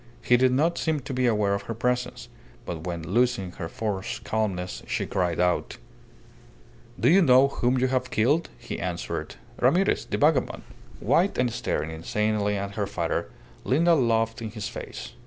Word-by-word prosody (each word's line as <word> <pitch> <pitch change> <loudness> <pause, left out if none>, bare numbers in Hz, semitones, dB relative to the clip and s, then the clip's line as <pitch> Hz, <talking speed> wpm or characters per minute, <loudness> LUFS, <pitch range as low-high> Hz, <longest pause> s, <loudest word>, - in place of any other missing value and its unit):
He 125 - +5
did 130 +1 +4
not 155 +7 +1
seem 155 -3 0
to 135 - -6
be 125 -1 +1
aware 105 -3 +2
of 100 - -1
her 115 - -2
presence, 125 0 -2 0.4
but 80 -1 -5
when, 85 -2 -4
losing 115 0 +1
her 85 -2 -5
forced 100 -2 -4
calmness, 95 -5 -2
she - - -1
cried 90 -3 -1
out 90 -1 0 1.2
"Do - - +2
you 190 +4 +6
know 135 -3 +6
whom 125 -1 0
you 130 - +2
have 130 -1 0
killed?" 140 +10 +2
he - - -6
answered - - -4 0.2
"Ramirez 175 +11 +2
the - - -2
vagabond." - - +2 0.4
White, 185 +4 +2
and 125 -2 +1
staring 80 -7 -2
insanely 105 +5 -1
at 100 0 -4
her 100 -2 -2
father, 85 -4 -2 0.3
Linda 170 +6 +3
laughed 115 -5 +1
in 110 - -4
his 110 -1 -5
face. - - -7
115 Hz, 170 wpm, -26 LUFS, 100-130 Hz, 1.2 s, you